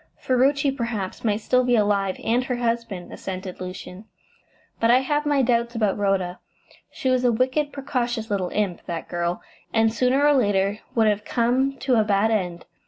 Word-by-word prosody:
"Ferruci, 275 Hz, +2 st, +2 dB
perhaps, 230 Hz, -7 st, -4 dB
might 215 Hz, -1 st, 0 dB
still 255 Hz, +3 st, +2 dB
be 245 Hz, -1 st, +2 dB
alive, 200 Hz, -3 st, +1 dB
and 245 Hz, +3 st, +1 dB
her 255 Hz, -, -1 dB
husband," 230 Hz, -6 st, -3 dB
assented 185 Hz, -1 st, -6 dB
Lucian, 185 Hz, +2 st, -8 dB, 0.7 s
"but 230 Hz, -, +2 dB
I 250 Hz, +2 st, +6 dB
have 295 Hz, +2 st, -1 dB
my 285 Hz, -2 st, +3 dB
doubts 235 Hz, -1 st, +1 dB
about 210 Hz, -4 st, +1 dB
Rhoda. 195 Hz, -3 st, -1 dB, 0.5 s
She 260 Hz, -, -2 dB
was 255 Hz, -1 st, +2 dB
a 245 Hz, -, +4 dB
wicked, 260 Hz, +5 st, 0 dB
precocious 240 Hz, -5 st, -3 dB
little 190 Hz, -3 st, 0 dB
imp, 200 Hz, -5 st, -2 dB
that 170 Hz, -1 st, -4 dB
girl, 175 Hz, 0 st, -2 dB, 0.3 s
and 225 Hz, -1 st, +2 dB
sooner 255 Hz, +4 st, +2 dB
or 295 Hz, -, +5 dB
later 205 Hz, -5 st, +1 dB, 0.2 s
would 225 Hz, -2 st, +4 dB
have 210 Hz, -1 st, +1 dB
come 255 Hz, +4 st, +1 dB
to 260 Hz, -3 st, +2 dB
a -, -, +4 dB
bad 210 Hz, +1 st, +2 dB
end. 180 Hz, -5 st, -2 dB
230 Hz, 175 wpm, -23 LUFS, 200-255 Hz, 0.7 s, I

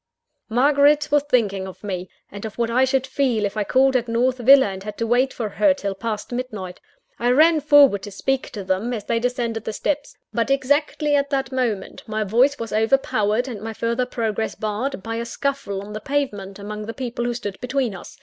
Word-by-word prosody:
Margaret 285 Hz, +5 st, +3 dB
was 295 Hz, 0 st, +5 dB
thinking 200 Hz, -7 st, +1 dB
of 190 Hz, -, -11 dB
me, 185 Hz, -3 st, -4 dB, 0.2 s
and 200 Hz, 0 st, -8 dB
of 220 Hz, -1 st, -6 dB
what 235 Hz, -1 st, 0 dB
I 255 Hz, +3 st, +4 dB
should 265 Hz, 0 st, +1 dB
feel 260 Hz, -5 st, 0 dB
if 200 Hz, -, -3 dB
I 210 Hz, -, 0 dB
called 265 Hz, +4 st, +3 dB
at 240 Hz, -2 st, +1 dB
North 250 Hz, +2 st, +1 dB
Villa, 270 Hz, +3 st, +7 dB
and 190 Hz, -1 st, -5 dB
had 210 Hz, +1 st, -7 dB
to 230 Hz, -, -1 dB
wait 245 Hz, +3 st, +2 dB
for 225 Hz, -, -3 dB
her 280 Hz, +7 st, +2 dB
till 200 Hz, -7 st, -3 dB
past 215 Hz, +2 st, -5 dB
midnight. 215 Hz, -8 st, -5 dB, 0.4 s
I 240 Hz, -, +1 dB
ran 310 Hz, +5 st, +5 dB
forward 285 Hz, -8 st, +6 dB
to 205 Hz, -, -7 dB
speak 270 Hz, +7 st, -1 dB
to 205 Hz, -4 st, -5 dB
them, 190 Hz, +6 st, -1 dB
as 210 Hz, -, -5 dB
they 230 Hz, -1 st, 0 dB
descended 235 Hz, -2 st, -2 dB
the -, -, -3 dB
steps; 285 Hz, +6 st, -2 dB, 0.2 s
but 230 Hz, +1 st, 0 dB
exactly 285 Hz, +2 st, +1 dB
at 280 Hz, 0 st, +1 dB
the 275 Hz, -2 st, 0 dB
same 260 Hz, -, -8 dB
moment, 235 Hz, -6 st, -2 dB
my 215 Hz, 0 st, -1 dB
voice 245 Hz, +8 st, +3 dB
was 230 Hz, -1 st, -5 dB
overpowered, 220 Hz, 0 st, +1 dB
and 225 Hz, -6 st, -6 dB
my 225 Hz, +1 st, -5 dB
further 235 Hz, +3 st, -1 dB
progress 225 Hz, -3 st, -2 dB
barred, 215 Hz, +2 st, -3 dB
by 225 Hz, 0 st, -4 dB
a 230 Hz, -, -2 dB
scuffle 235 Hz, -5 st, -3 dB
on 210 Hz, +1 st, -9 dB
the 215 Hz, -, -5 dB
pavement 210 Hz, -8 st, -2 dB
among 210 Hz, +1 st, -6 dB
the 230 Hz, -, -6 dB
people 240 Hz, -2 st, -3 dB
who 240 Hz, 0 st, -1 dB
stood 205 Hz, -5 st, -6 dB
between 250 Hz, -3 st, -1 dB
us. 180 Hz, -, -11 dB
235 Hz, 215 wpm, -22 LUFS, 210-270 Hz, 0.4 s, Villa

